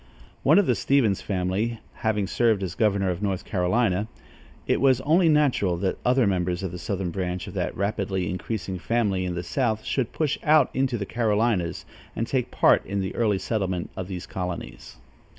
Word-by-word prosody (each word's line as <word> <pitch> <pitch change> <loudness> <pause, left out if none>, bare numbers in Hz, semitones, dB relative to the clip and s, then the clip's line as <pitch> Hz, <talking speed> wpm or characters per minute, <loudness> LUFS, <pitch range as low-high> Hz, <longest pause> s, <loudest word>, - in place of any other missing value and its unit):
One - - +5
of 205 - +5
the 125 - +3
Stevens 120 -6 +2
family 100 +4 -1 0.2
having 105 -2 0
served 110 0 +1
as 90 -3 -3
governor 100 -4 +1
of 90 +2 -5
North 100 -3 -2
Carolinia, 100 +2 +1 0.6
it - - +1
was 130 -2 +4
only 165 +5 +4
natural 135 - +2
that 95 +2 -2
other 125 0 +3
members 90 -2 0
of 95 - -3
the 90 - -7
southern 95 -1 -3
branch 90 -1 -3
of - - -9
that - - -3
rapidly 100 -2 -1
increasing 95 0 -4
family 100 -3 0
in 90 -1 -3
the 90 - -3
south 110 +3 -1
should 130 -5 -1
push 150 -3 -1
out 150 -3 +4
into 130 -2 0
the 100 - -3
Carolinias 110 -5 0 0.3
and 115 - -1
take 125 0 -1
part - - +4
in 100 0 -3
the 95 - -3
early 105 -4 +1
settlement 95 -4 -2
of 95 - -5
these 90 -2 -6
colonies. 90 -2 -6
100 Hz, 185 wpm, -25 LUFS, 90-120 Hz, 0.6 s, One